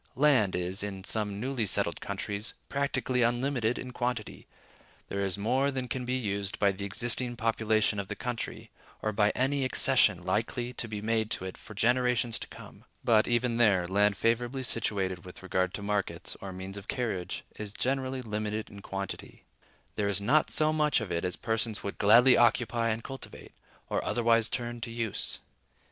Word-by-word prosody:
Land 130 -8 +4
is, 90 +2 -1
in 95 -2 -4
some 105 -1 -1
newly 125 -2 -1
settled - - +2
countries, 105 +2 -4
practically 135 -2 0
unlimited 120 0 +1
in 130 - -6
quantity: 125 -3 -3 0.6
there 100 - -3
is 95 -1 +1
more 130 +7 +1
than 130 -2 -3
can 125 +1 -3
be 125 +1 0
used 100 -5 -2
by 100 -1 +3
the 100 +1 -5
existing 120 +4 0
population 110 -2 +1
of 100 - -4
the - - -4
country, 120 -2 -5 0.3
or 110 - +1
by 105 0 +3
any 135 +2 +1
accession 130 -8 +3
likely 115 +5 -1
to 120 - -3
be 105 -1 -5
made 110 -1 +1
to 95 - -2
it 95 - -5
for 110 - -12
generations 120 +1 +2
to - - -6
come. - - -13 0.2
But, 110 -2 +4
even 120 0 +1
there, 100 -7 +4
land 100 +1 +3
favorably 120 +5 0
situated 95 -6 -1
with 90 0 -12
regard 95 -1 0
to 105 - -6
markets, 105 -1 -2
or 100 - -6
means 95 +2 -7
of 100 - -9
carriage, 105 -8 -2
is 105 -1 -5
generally 130 +2 -1
limited 110 -1 -3
in 100 - -10
quantity: 100 -1 -6 0.5
there 105 - +1
is 100 -1 +1
not 135 +10 +3
so 155 0 +3
much 150 -3 +3
of 110 -5 -5
it 85 - -1
as 90 -1 -1
persons 110 -1 -1
would 100 - -5
gladly 120 +5 +7
occupy 120 0 +3
and 110 +1 -2
cultivate, 135 -1 -9 0.4
or - - -1
otherwise 115 -1 +3
turn 120 -1 -3
to 115 - -4
use. 115 -2 -2
115 Hz, 180 wpm, -29 LUFS, 100-125 Hz, 0.6 s, gladly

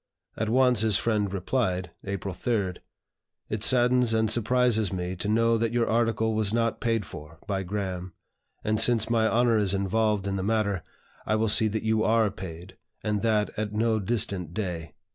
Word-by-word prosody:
At 110 0 -2
once, 125 -2 +3
his 110 -3 +3
friend 105 -4 0
replied 95 -3 -1
(April 100 -1 -4
3), 100 -1 -1 0.8
"It 105 0 -3
saddens 125 -1 +3
and 110 -1 +2
surprises 120 -1 +1
me 90 -1 -3
to 95 - -3
know 115 +1 +3
that 115 0 0
your 120 -1 +1
article 110 -1 +1
was 110 -2 0
not 115 0 0
paid 115 -3 0
for 75 +2 -10
by 95 -1 -1
Graham; 95 -2 -4 0.5
and, 110 +1 0
since 115 -1 +2
my 110 -1 +3
honor 115 -1 +3
is 100 -2 +1
involved 105 +1 +1
in 100 0 -1
the - - -2
matter, 100 -3 0 0.5
I 110 - +2
will 110 0 +1
see 110 +1 +3
that 110 +1 -2
you 110 0 +1
are 110 -2 +3
paid, 90 -1 -9 0.3
and 105 -2 0
that 105 -1 +1
at 105 -1 -3
no 110 +1 +1
distant 95 -5 -2
day." 90 -6 -4
110 Hz, 180 wpm, -27 LUFS, 95-115 Hz, 0.8 s, once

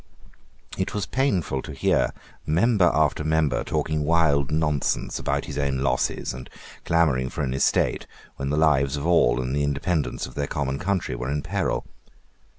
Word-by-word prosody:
It 95 - -2
was 105 -4 -1
painful 95 - 0
to - - -8
hear - - +1 0.3
member 90 +4 +3
after 75 -1 +1
member 75 -5 +1
talking 75 +3 -1
wild 75 -4 +2
nonsense 75 -2 0
about - - -1
his - - -5
own 70 -1 0
losses, 70 +1 0
and 65 0 -9 0.4
clamouring 75 -7 +2
for - - -4
an 65 -2 -1
estate, 65 - +1 0.3
when 70 0 -3
the 75 - 0
lives 75 -3 +3
of 70 - -4
all 75 -8 +4
and 65 +2 -2
the 75 - +1
independence 70 +3 -1
of 65 - -10
their 70 +2 -2
common 70 -1 -2
country 95 -7 -1
were 60 +2 -4
in 75 +1 -2
peril. - - -1
75 Hz, 165 wpm, -24 LUFS, 65-85 Hz, 0.4 s, all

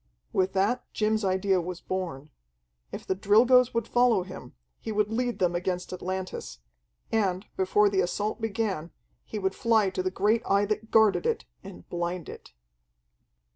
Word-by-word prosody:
With 190 0 +1
that 200 +6 0
Jim's 215 0 +1
idea 190 0 +2
was 180 0 -6
born. 165 -6 -5 0.6
If - - -7
the - - 0
Drilgoes 235 +6 +5
would 230 -1 0
follow 240 -6 +3
him, 185 -9 -10 0.2
he 220 - -5
would 210 0 0
lead 245 +1 -1
them 180 -1 +1
against 180 +1 -2
Atlantis. 185 - -5 0.5
And, 195 -4 0
before 200 +2 +3
the 195 -1 +2
assault 205 +6 -2
began, 205 -7 -2 0.3
he - - -6
would 190 -2 -1
fly 220 -4 +2
to 185 - -2
the 185 - 0
great 210 +4 +1
Eye 200 +1 +2
that 215 +1 -3
guarded 205 -5 +4
it, - - -1 0.2
and 90 - -11
blind 175 -1 -3
it. - - -11
195 Hz, 160 wpm, -27 LUFS, 185-220 Hz, 0.6 s, Drilgoes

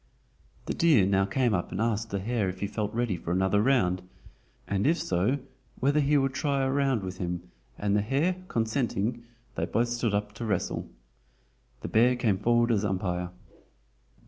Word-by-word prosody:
The - - -2
deer 150 - +4
now 95 0 +2
came 120 +3 +1
up 90 -3 -1
and - - -4
asked 115 0 0
the 100 - -2
hare 105 0 -1
if 90 0 -7
he - - +1
felt 105 +1 -3
ready 120 -4 0
for 85 0 -5
another 95 +3 +2
round, 95 -8 +2 0.7
and 100 +4 0
if 165 +3 +3
so 95 - +1 0.4
whether 140 +3 +3
he 145 0 +3
would 135 -1 +1
try 140 0 0
a 130 - +1
round 135 -6 +1
with 95 0 -6
him, 90 -1 -3 0.3
and 100 0 0
the 105 - +3
hare 145 - +1
consenting, 115 - -1 0.3
they - - -1
both 120 +1 0
stood 120 -3 0
up 105 0 -2
to 115 +2 -6
wrestle. 100 -5 -2 0.9
The - - -4
bear 120 +3 +4
came 110 -6 +1
forward 120 +2 +3
as 105 -2 +2
umpire. 90 -3 -1
110 Hz, 180 wpm, -28 LUFS, 95-125 Hz, 0.9 s, deer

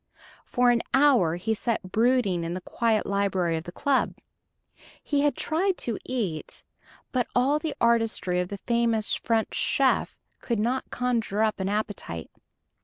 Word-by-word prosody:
For 245 -1 +3
an 235 -1 +2
hour 260 - +4
he 220 +6 -1
sat 220 -4 -2
brooding 225 -6 +2
in 165 +1 -3
the 185 - -5
quiet 225 +2 0
library 190 -4 0
of 160 +1 -4
the 175 - -7
club. 275 +8 0 0.9
He 285 -1 +1
had 290 0 +2
tried 360 +4 0
to 230 -3 -3
eat; 205 -12 -4 0.5
but 250 -2 0
all 270 +5 +3
the 310 -1 -4
artistry 225 -6 +2
of 180 - -1
the 200 - -5
famous 230 0 0
French 225 -1 0
chef - - +1 0.2
could 235 - -2
not 240 +5 -1
conjure 230 -4 0
up 215 -2 0
an 190 0 -1
appetite. 205 - -4
225 Hz, 155 wpm, -26 LUFS, 190-250 Hz, 0.9 s, hour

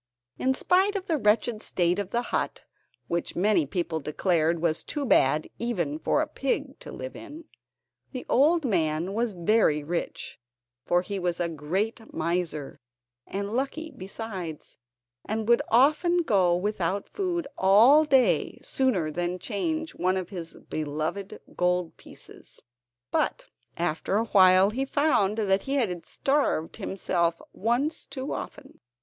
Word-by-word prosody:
In 265 +1 +1
spite 380 +7 +2
of 380 -2 -3
the 325 -6 0
wretched 215 0 +2
state 175 +1 0
of 200 -2 -3
the 240 +3 -1
hut, - - -1 0.5
which 170 0 -2
many 190 -5 +2
people 170 0 -2
declared 165 +2 +1
was 160 -1 0
too 290 -2 -4
bad 150 - +3
even 175 -11 -2
for 295 - +1
a - - -5
pig 275 0 -2
to - - -10
live - - -7
in, 320 0 -10 0.7
the 255 -2 -6
old 310 +4 +3
man 170 -3 0
was 230 0 -1
very 175 -4 +2
rich, 170 +3 -4 0.4
for 175 0 +2
he 200 +1 -4
was 175 -1 -1
a 175 - +1
great 185 +9 -3
miser, 165 -3 -2 0.5
and 200 +2 -4
lucky 280 +6 -2
besides, 185 -5 -7 0.5
and 220 0 -2
would 235 0 +5
often 310 +8 +4
go 185 - +3
without 190 0 -1
food 355 -5 -2
all 230 +11 +6
day 270 -4 +2
sooner 200 -13 0
than 175 +2 -2
change 315 - -2
one 185 +2 0
of 185 -1 -4
his 175 -4 -7 0.2
beloved 155 +6 -3 0.2
gold 180 -1 0
pieces. - - -13 0.5
But - - 0 0.3
after 175 +3 -1
a 225 - +1
while 190 -1 +6
he 260 +5 -1
found 270 -8 +1
that 195 -3 +2
he 275 - -2
had 185 -11 -1
starved 275 - 0
himself 175 -4 -1
once 240 - 0
too 275 0 -5
often. - - -8
200 Hz, 145 wpm, -27 LUFS, 175-260 Hz, 0.7 s, all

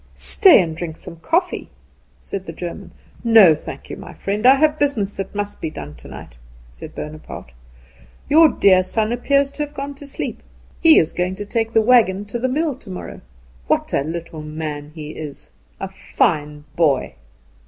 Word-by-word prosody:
"Stay 385 - +6
and 165 -4 -1
drink 165 -1 -6
some 170 -2 -11
coffee," 165 - -1 0.5
said 195 -1 -6
the - - -4
German. 170 +1 -7 0.3
"No, 225 -8 +7
thank 155 - -8
you, - - -6
my - - -10
friend; 210 +4 0
I 265 - +8
have 305 +2 +2
business 225 -9 0
that 195 +1 -6
must 205 0 -4
be 160 - -2
done 75 - -8
tonight," - - -12 0.3
said - - -11
Bonaparte. 150 - -8 0.7
"Your 320 +2 +7
dear 190 -7 +4
son 215 +4 -1
appears 275 +3 +1
to 300 - -3
have 295 0 -9
gone 280 0 -5
to 280 +1 -12
sleep. 280 - -5 0.4
He 325 -1 +7
is 160 - +3
going 180 +1 -1
to 205 +1 -6
take 225 +1 -2
the 225 - +5
wagon 215 -5 +4
to 205 +4 -5
the 255 +2 0
mill 300 +3 0
tomorrow! 195 -8 -9 0.5
What - - 0
a - - +2
little 160 +1 -6
man 150 -1 -6
he 150 -2 -7
is." 150 -3 -9 0.3
"A 195 - -3
fine 150 -6 -1
boy." 155 -6 +1
195 Hz, 175 wpm, -20 LUFS, 160-250 Hz, 0.7 s, I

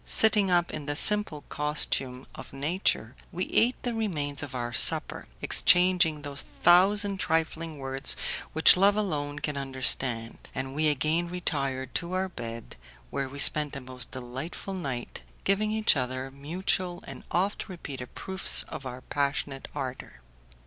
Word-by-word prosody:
Sitting 210 -3 +3
up 175 -1 +2
in 145 - -6
the 145 - -1
simple 210 -5 +5
costume 135 -3 -1
of - - -11
nature, 140 - -1 0.2
we 180 +2 -2
ate 245 +3 +3
the 245 - -2
remains 150 -11 -2
of 145 -2 -7
our 120 -1 -4
supper, - - +3 0.2
exchanging 175 -4 +4
those 145 -1 -4 0.2
thousand 195 +3 +4
trifling 165 -1 -1
words 135 0 -2 0.4
which 160 - +7
love 200 +2 +4
alone 145 -9 -2
can 145 0 -3
understand, 130 -3 +1 0.2
and 130 0 -4
we 155 +2 +1
again 155 +4 +1
retired 140 -7 -3
to 175 +1 -3
our 190 +1 -1
bed, 115 -7 -8 0.3
where 135 -1 -3
we 140 - -9
spent 150 +1 +3
a - - -4
most 125 -2 0
delightful 130 +10 -6
night 135 - -5 0.2
giving 200 +2 +1
each 220 -3 +3
other 130 0 -3
mutual 175 +5 -3
and - - -10
oft 195 +4 -1
repeated 140 -8 -8
proofs 190 0 +1
of 135 - -7
our 125 0 -8
passionate 140 0 -2
ardour. 130 - -6
150 Hz, 150 wpm, -27 LUFS, 135-180 Hz, 0.4 s, which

